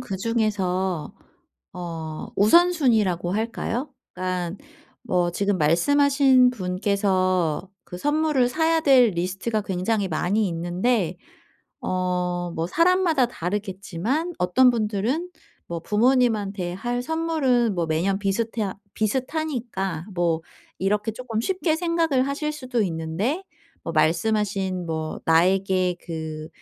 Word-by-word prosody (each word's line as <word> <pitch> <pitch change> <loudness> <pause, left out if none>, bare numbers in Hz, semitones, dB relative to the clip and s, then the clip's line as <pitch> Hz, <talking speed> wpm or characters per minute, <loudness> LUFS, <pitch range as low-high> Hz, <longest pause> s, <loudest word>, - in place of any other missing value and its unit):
그중에서 190 -5 -1 0.6
어 165 -3 -6
우선순위라고 220 - +3
할까요? 230 +4 -2 0.2
그러니까 180 0 -3 0.5
뭐 180 -7 +1
지금 200 0 0
말씀하신 265 - +4
분께서 185 -4 0 0.2
그 180 - -8
선물을 295 -1 +2
사야 325 +3 +2
될 260 -6 +5
리스트가 190 +5 -2
굉장히 195 +1 -1
많이 190 +6 0
있는데 175 +3 0 0.6
어 180 -1 -1 0.2
뭐 165 +1 -1
사람마다 335 - +3
다르겠지만 200 - -3
어떤 215 +9 +4
분들은 235 - -1 0.4
뭐 170 -1 -4
부모님한테 210 -5 +1
할 245 +5 -2
선물은 285 -8 +1
뭐 170 -2 -1
매년 180 +5 0
비슷해 210 0 -1 0.2
비슷하니까 230 - -2
뭐 170 -2 0 0.4
이렇게 210 +3 0
쪼끔 225 -2 -4
쉽게 360 +1 0
생각을 330 -6 +1
하실 300 +2 -2
수도 255 -6 -2
있는데 180 - -2 0.4
뭐 165 - -3
말씀하신 185 +2 +1
뭐 160 -1 -4
나에게 185 +2 +3
그 160 -2 -6
205 Hz, 250 characters per minute, -24 LUFS, 180-255 Hz, 0.6 s, 될